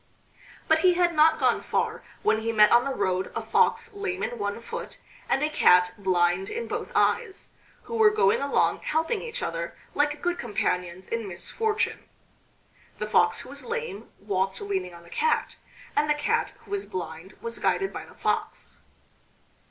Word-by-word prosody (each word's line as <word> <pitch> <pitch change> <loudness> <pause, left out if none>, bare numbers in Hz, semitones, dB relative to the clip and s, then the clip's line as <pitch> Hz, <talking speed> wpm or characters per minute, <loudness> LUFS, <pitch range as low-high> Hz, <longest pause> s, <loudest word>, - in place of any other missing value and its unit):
But 320 0 +4
he 360 +1 +4
had 350 -1 +3
not 315 0 +5
gone - - +2
far - - -1 0.2
when 310 - +3
he 225 +1 -1
met 210 -1 +6
on 240 +1 +5
the 275 - -1
road 185 -2 -1
a - - -1
Fox 460 - +2
lame 395 -2 -3
in 240 -1 -3
one 205 +1 -2
foot, 230 - -7 0.3
and 270 - +2
a - - +3
Cat 180 -8 +5
blind 185 -1 +1
in 470 +1 -4
both - - -4
eyes, 385 - +1 0.3
who 465 - -6
were 440 -1 +7
going 205 - +3
along 280 0 +2
helping 325 +8 -1
each 470 - -5
other - - -4 0.2
like 295 0 +1
good 350 0 0
companions 180 -5 -2
in 230 -2 -3
misfortune. 425 - -2 0.9
The - - -3
Fox - - +3
who - - -11
was - - -8
lame 465 - -5
walked 195 -1 -1
leaning 190 -3 -3
on 170 - -13
the 170 - -17
Cat, 470 - 0 0.4
and 300 - +2
the 300 - +4
Cat 295 0 0
who - - -16
was 400 -1 -2
blind 170 0 -6
was 230 0 -5
guided 390 -1 0
by - - -6
the - - -17
Fox. - - -3
235 Hz, 175 wpm, -26 LUFS, -, 0.9 s, were